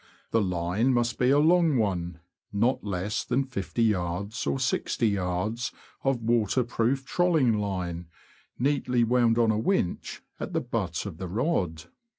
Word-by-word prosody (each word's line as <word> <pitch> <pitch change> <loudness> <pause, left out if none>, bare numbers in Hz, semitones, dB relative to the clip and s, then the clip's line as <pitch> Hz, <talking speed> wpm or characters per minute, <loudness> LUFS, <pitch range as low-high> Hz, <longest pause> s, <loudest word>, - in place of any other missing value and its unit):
The 115 - +3
line 90 +6 +1
must 120 -1 0
be 125 - +3
a 140 - +5
long 160 -1 +4
one 90 -6 -1
— - - -67
not 115 +6 +1
less 100 +1 -2
than 130 +2 0
50yds. 100 - -1
or 70 -1 +1
6oyds. 100 - -1 0.3
of 135 -4 0
waterproof 120 +3 +1
trolling 155 -10 +2
line, 90 -4 -3 0.5
neatly 125 -2 +1
wound 120 -1 +3
on 115 -2 +4
a 105 - 0
winch 110 - -1 0.2
at - - -5
the - - +1
butt 105 -9 -3
of 95 -6 -6
the 95 - -4
rod. 90 - -1
115 Hz, 145 wpm, -27 LUFS, 90-125 Hz, 0.5 s, a